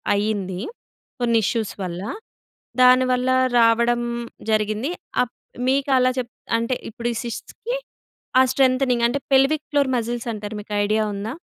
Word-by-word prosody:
అయ్యింది, 200 -3 -1 0.6
కొన్ని 235 -1 +3
ఇష్యూస్ 225 -1 -1
వల్ల. 180 -1 -4 0.8
దానివల్ల 255 0 +4 0.3
రావడం 235 +1 +4 0.5
జరిగింది. 215 +6 0 0.3
అప్ 250 - -8 0.3
మీకలా 265 -2 +3
చెప్ 240 -2 -5 0.3
అంటే, 230 +2 -1 0.2
ఇప్పుడు 235 +2 -3
ఈ - - -8
సిస్ట్స్‌కి 455 - -5 0.6
ఆ - - +7
స్ట్రెంథెనింగ్ 255 -2 +3
అంటే, 260 +4 -1
పెల్విక్ 275 +3 +3
ఫ్లోర్ 285 -2 +2
మజిల్స్ 235 +1 -3
అంటారు 210 0 -6
మీకు 210 0 -9
ఐడియా 215 +1 +1
ఉందా? 215 +6 -4
235 Hz, 125 wpm, -22 LUFS, 215-255 Hz, 0.8 s, ఆ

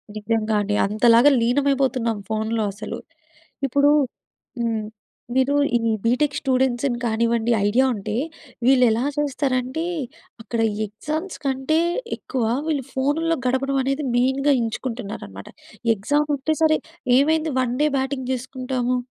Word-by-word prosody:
నిజ్జంగా 215 0 -1
అండి. 205 0 -1
అంతలాగా 230 +6 +5
లీనమైపోతున్నాం, 255 -2 +1
ఫోన్లో 220 0 -1
అసలు. 210 - -6 0.7
ఇప్పుడూ 285 +3 +3 0.7
హ్మ్. 225 -2 -1 0.5
మీరూ 265 +2 +3 0.2
ఈ - - -3 0.3
బీటెక్ 280 +5 +2
స్టూడెంట్స్‌ని 260 -1 +1
కానివ్వండి, 230 0 +1 0.2
ఐడియా 250 +6 +3
ఉంటే, 210 0 -4 0.5
వీళ్ళెలా 250 -3 +4
చేస్తారంటే, 270 0 -1 0.6
అక్కడ 230 +1 -4 0.3
ఎగ్జామ్స్ 305 - -5
కంటే 270 +3 +1 0.4
ఎక్కువ 255 -3 -3 0.2
వీళ్ళు 290 -4 0
ఫోనుల్లో 300 +5 +1
గడపడమనేది 270 +2 0
మెయిన్‌గా 265 +3 +2
ఎంచుకుంటున్నారనమాట. 225 - -5 0.5
ఎగ్జాముంటే 290 +7 0
సరే, 310 -1 +4 0.4
ఏమైంది 315 +2 +2
వన్ 245 -1 0
డే 300 - +4
బ్యాటింగ్ 265 -1 -2
జేసుకుంటాము, 255 0 -2
255 Hz, 105 wpm, -22 LUFS, 230-280 Hz, 0.7 s, అంతలాగా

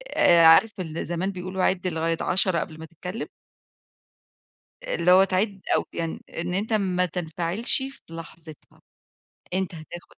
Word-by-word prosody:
آآ، 170 -1 +5
عارف 195 +6 +6
ال 165 -2 -4
زمان 175 +3 -2
بيقولوا 185 0 -4
عِدْ 185 -1 +1
لغاية 165 -1 -1
10، 185 -1 +2
قبل 160 -1 -6
ما 160 - -8
تتكلّم؟ 180 +7 -7 1.6
آآ، - - -3
اللي 175 +2 +2
هو 190 +1 +7
تعيد 195 +1 -1
أو - - -1
يعن 165 -1 -4 0.2
إن 175 +2 -3
أنت 210 +4 -2
ما 185 -4 +1
تنفعلش 175 - +1
في 270 0 -7
لحظتها، 165 -2 -12 0.7
أنت 185 -1 -2
هتاخد 165 +2 -11
180 Hz, 145 wpm, -24 LUFS, 165-190 Hz, 1.6 s, هو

